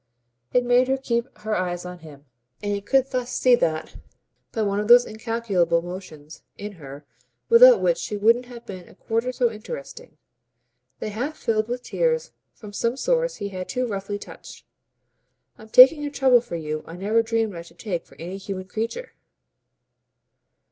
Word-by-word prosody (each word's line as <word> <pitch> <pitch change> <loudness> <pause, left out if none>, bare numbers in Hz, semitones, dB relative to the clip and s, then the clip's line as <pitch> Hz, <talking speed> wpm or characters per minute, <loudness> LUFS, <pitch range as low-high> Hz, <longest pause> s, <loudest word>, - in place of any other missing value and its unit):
It 250 0 +2
made 245 +1 +4
her 265 0 +1
keep 235 -2 -1
her 215 0 -3
eyes 180 -1 -2
on 180 0 -8
him, 150 -3 -14 0.4
and 205 - -1
he 200 - -2
could 270 +5 +1
thus 250 -1 -2
see 255 - +3
that, 160 -9 0 0.5
by 225 - -1
one 200 0 0
of 210 - -2
those 245 +1 +8
incalculable 215 -7 0
motions 175 -4 -9 0.2
in 210 +1 -6
her 140 +1 -10 0.4
without - - +8
which - - +2
she 210 - -4
wouldn't 230 +4 +3
have 240 -1 -11
been 185 -3 -9
a - - -18
quarter 230 +5 -2
so 245 -2 +1
interesting, 220 - -9 0.8
they - - -5
half 260 +9 -4
filled 220 -1 0
with 245 +1 -4
tears 480 - -1 0.2
from 210 -2 -12
some 235 +4 -1
source - - 0
he 200 - -5
had 185 -2 -6
too 255 -1 -1
roughly 205 -2 -4
touched. - - -12 0.9
"I'm 220 - -13
taking 265 +6 +8
a 290 - -2
trouble 260 -4 +4
for 240 -7 -7
you 155 -1 -4
I 165 - -9
never 210 +5 +1
dreamed 225 -3 -1
I 170 - -6
should 170 0 -16
take 180 -5 -4
for - - -19
any 180 +3 -7
human 195 -1 -6
creature." 230 - -4
220 Hz, 175 wpm, -24 LUFS, 185-250 Hz, 0.9 s, those